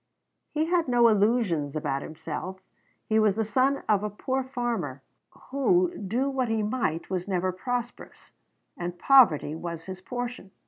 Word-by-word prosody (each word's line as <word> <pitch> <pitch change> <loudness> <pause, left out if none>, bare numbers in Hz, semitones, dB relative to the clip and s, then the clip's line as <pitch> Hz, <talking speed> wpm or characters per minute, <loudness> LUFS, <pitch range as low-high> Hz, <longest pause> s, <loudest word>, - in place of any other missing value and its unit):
He 310 +1 0
had 340 -1 +1
no 240 -1 +5
illusions 200 - +1
about 140 -3 -1
himself: 165 +4 -6 0.5
he 220 0 +2
was 210 -3 +3
the 220 0 0
son 260 +6 +1
of 205 -2 +3
a 210 - -1
poor 260 +6 -2
farmer, 235 - -3 0.5
who, 350 +6 +2
do 230 +7 -1
what 265 -3 -1
he 220 -1 0
might, 210 -8 -2
was 185 0 -2
never 185 -1 0
prosperous; 240 +6 -5 0.4
and 175 0 -5
poverty 195 - +5
was 165 0 -6
his 185 -1 -7
portion. 245 -1 -5
215 Hz, 150 wpm, -27 LUFS, 175-255 Hz, 0.5 s, no